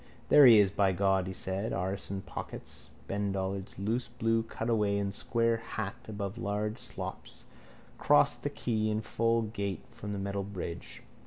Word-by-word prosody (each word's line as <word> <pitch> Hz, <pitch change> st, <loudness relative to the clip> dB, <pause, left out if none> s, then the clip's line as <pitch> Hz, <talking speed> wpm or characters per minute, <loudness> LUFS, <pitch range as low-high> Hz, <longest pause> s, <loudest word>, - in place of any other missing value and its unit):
—There 145 Hz, -2 st, +9 dB
he 115 Hz, -2 st, +9 dB
is, 100 Hz, -2 st, +5 dB
by 100 Hz, -1 st, +2 dB
God, 95 Hz, 0 st, +2 dB
he 95 Hz, -, -4 dB
said, 95 Hz, +3 st, -3 dB
arse 95 Hz, +2 st, -3 dB
and 95 Hz, 0 st, -4 dB
pockets. -, -, -8 dB, 0.2 s
Ben 100 Hz, 0 st, -1 dB
Dollard's 95 Hz, 0 st, -3 dB
loose 110 Hz, +6 st, -1 dB
blue 115 Hz, 0 st, +1 dB
cutaway 110 Hz, -2 st, 0 dB
and 100 Hz, -1 st, -1 dB
square 115 Hz, +1 st, +1 dB
hat 115 Hz, 0 st, -4 dB
above 100 Hz, 0 st, -4 dB
large 105 Hz, +1 st, -2 dB
slops -, -, -7 dB, 0.5 s
crossed 75 Hz, -, +4 dB
the -, -, -1 dB
quay 110 Hz, -3 st, -1 dB
in 110 Hz, 0 st, 0 dB
full 115 Hz, +1 st, +1 dB
gait 100 Hz, -3 st, -3 dB
from 115 Hz, -3 st, -7 dB
the 100 Hz, -, -3 dB
metal 100 Hz, 0 st, -2 dB
bridge. 95 Hz, -4 st, -6 dB
100 Hz, 165 wpm, -31 LUFS, 95-115 Hz, 0.5 s, There